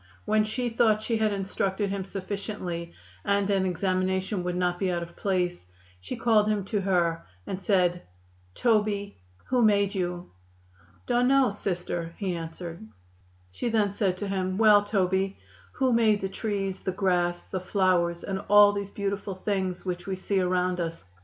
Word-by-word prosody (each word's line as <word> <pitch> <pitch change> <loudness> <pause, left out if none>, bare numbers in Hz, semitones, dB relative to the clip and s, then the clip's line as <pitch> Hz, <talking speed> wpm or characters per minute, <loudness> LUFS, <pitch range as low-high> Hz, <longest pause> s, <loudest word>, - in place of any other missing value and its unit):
When 215 0 +3
she 240 +4 -2
thought 225 -2 +2
she 230 0 0
had 215 -1 +2
instructed 195 0 -1
him 195 -1 -3
sufficiently 195 -3 -5 0.3
and 200 0 +1
an 190 -1 +2
examination 185 +1 0
would 180 0 -2
not 180 0 0
be 190 -2 +1
out 170 -1 -1
of 170 0 -11
place, 180 - -1 0.4
she 90 - -6
called 215 -3 +3
him 210 -3 0
to 205 0 -1
her 170 -3 +1 0.2
and 190 0 -5
said: 180 -3 +2 0.5
"Toby, 210 - +1 0.3
who 255 -1 +1
made 200 -2 +3
you?" 180 -2 -3 0.7
"Dun 245 +1 +2
no, 270 -3 +4
Sister," 175 -4 -3
he 195 -4 -2
answered. 165 -1 -7 0.7
She 165 - -3
then 215 -3 +2
said 195 -3 0
to 205 - -4
him: 185 -1 -1
"Well, 210 -2 +6
Toby, 190 -1 0 0.4
who 260 -2 +1
made 220 -3 +3
the 195 - -2
trees, 195 -2 -3
the 190 - -2
grass, 180 -2 0
the 185 - -4
flowers 180 -2 +1
and 195 -1 -3
all 205 0 +8
these 200 -1 -3
beautiful 200 -1 -3
things 190 -2 -2
which 180 0 -4
we 190 - -1
see 190 +1 -1
around 180 0 +1
us?" 165 - -4
195 Hz, 165 wpm, -27 LUFS, 180-205 Hz, 0.7 s, all